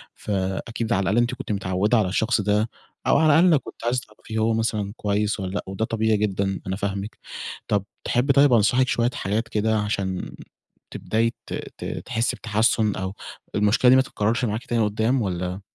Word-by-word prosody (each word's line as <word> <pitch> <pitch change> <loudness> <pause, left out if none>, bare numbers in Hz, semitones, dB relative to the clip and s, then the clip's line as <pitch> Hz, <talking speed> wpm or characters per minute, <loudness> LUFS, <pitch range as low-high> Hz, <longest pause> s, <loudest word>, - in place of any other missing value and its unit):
فأكيد 100 +3 -2
على 100 - +2
الأقل 100 +4 +1
أنتِ 120 +1 +2
كنتِ - - -6
متعوّدة 100 +3 +1
على 105 -4 +2
الشخص 110 +3 +1
ده 105 +2 +1 0.4
أو - - +5
على 155 0 +5
الأقل 170 -2 +6
كنتِ - - -10
عايزة 125 +1 +1
تعرفي 110 +1 -8
هو 110 +1 +2
مثلًا 110 -3 -1
كويس 105 +1 0
والّا 95 -1 -4
لأ 105 - -2
وده 95 +3 -2
طبيعي 110 -1 +1
جدًا 100 -2 -1
أنا 95 - -1
فاهمِك. 100 +1 -4 0.5
طَب 100 -2 0 0.2
تحبّي 130 +3 +2
طيب 140 -1 +5
أنصحِك 125 +3 +4
شوية 120 0 +1
حاجات 105 +4 -1
كده 110 0 +1
عشان 100 -3 -2 0.6
تبدأي 115 +1 0
ت - - -6 0.2
ت - - -7 0.2
تحسّي 115 +1 0
بتحسُّن 110 -1 +1
أو 95 +1 -4 0.4
المشكلة 105 +4 +4
دي 130 - +8
ما 130 - +6
تتكرّرش 115 -1 -1
معاكِ 110 +1 -3
تاني 115 -2 +1
قُدّام 110 +5 +1
والّا 90 -1 -3
110 Hz, 180 wpm, -24 LUFS, 100-115 Hz, 0.6 s, دي